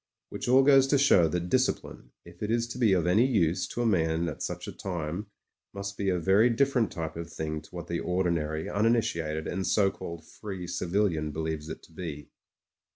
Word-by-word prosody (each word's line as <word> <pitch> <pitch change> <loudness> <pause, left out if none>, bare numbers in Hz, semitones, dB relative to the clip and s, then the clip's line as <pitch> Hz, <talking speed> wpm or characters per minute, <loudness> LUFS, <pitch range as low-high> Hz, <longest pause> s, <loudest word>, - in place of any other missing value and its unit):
Which - - -5
all 130 +2 +6
goes 135 -1 +6
to 140 - +3
show 115 -11 +5
that 90 +2 -2
discipline, 130 - -1 0.2
if 85 0 -15
it 105 - -2
is 115 +1 +1
to 125 - -6
be 115 -5 +4
of 90 -3 +2
any 105 +8 +4
use 90 -9 +1
to 120 - -3
a - - 0
man 85 -5 +1
at 75 - -8
such - - -4
a - - -4
time, 90 +2 -4 0.5
must 100 0 -5
be 100 -1 -1
a 90 - +1
very 95 +7 +4
dif 135 +4 +2
ferent 115 -5 +2
type 80 -2 -5
of 85 0 -6
thing 80 -1 -4
to 80 - -17
what 85 -1 -7
the 85 0 -3
ordinary, 85 -4 -1
uninitiated, 100 -8 0
and 95 0 -2
so 95 +1 +3
called 85 -3 -8
free 95 0 -7
civilian 90 -2 0
believes 80 0 -4
it - - -7
to - - -18
be. 80 -3 -7
90 Hz, 210 wpm, -28 LUFS, 80-110 Hz, 0.5 s, all